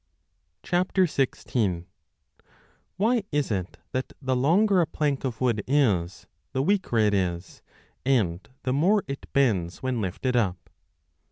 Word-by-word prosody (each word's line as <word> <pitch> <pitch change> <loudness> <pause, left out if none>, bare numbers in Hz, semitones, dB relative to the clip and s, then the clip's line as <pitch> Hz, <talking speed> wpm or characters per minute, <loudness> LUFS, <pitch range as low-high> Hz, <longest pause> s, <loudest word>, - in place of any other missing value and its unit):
5 180 +1 +1 2.1
WHY 225 +3 +2
is 145 -4 0
it 95 -3 -3
that 130 0 -3
the 130 -2 -1
longer 180 +9 +4
a 165 - +1
plank 145 -3 -1
of 125 -4 -3
wood 115 -5 +1
is, 105 -11 +1 0.3
the 130 - +1
weaker 190 - +1
16 110 - +4
it 105 - +2
is, 90 -2 -2 0.4
and 105 -10 +1
the 130 - 0
more 190 +9 +3
it 140 0 -7
bends 100 -11 +1
when 130 -3 -1
lifted 105 +7 -2
up 95 -7 -1
130 Hz, 135 wpm, -26 LUFS, 100-150 Hz, 2.1 s, longer